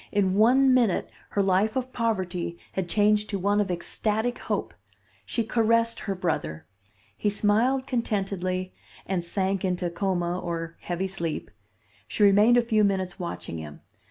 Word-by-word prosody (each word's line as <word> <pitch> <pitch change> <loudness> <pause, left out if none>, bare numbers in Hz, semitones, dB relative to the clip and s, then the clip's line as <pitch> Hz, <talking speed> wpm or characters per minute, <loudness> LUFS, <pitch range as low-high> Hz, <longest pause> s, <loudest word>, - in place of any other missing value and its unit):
In 195 -2 +2
one 255 +6 +5
minute 235 -7 +2 0.2
her 200 - +1
life 195 +3 +2
of 260 0 -3
poverty 185 -7 -2 0.2
had 185 -2 -3
changed 210 +1 +2
to 200 - -1
one 205 +2 +2
of 200 - -2
ecstatic 215 +6 -1
hope. - - -3 0.5
She 230 - -1
caressed 230 0 +2
her 195 - -3
brother. 80 - -2 0.5
He 210 - 0
smiled 225 +6 +2
contentedly, 195 -6 -2 0.3
and 185 -2 -1
sank 190 +2 -1
into 180 -2 -1
coma 175 -1 -1
or 165 -2 -4
heavy 175 +2 -3
sleep. 170 -5 -4 0.6
She 210 - 0
remained 205 +4 +6
a 240 - +4
few 220 -2 +2
minutes 190 -2 0
watching 170 - -5
him. 75 -1 -9
195 Hz, 150 wpm, -26 LUFS, 180-220 Hz, 0.6 s, remained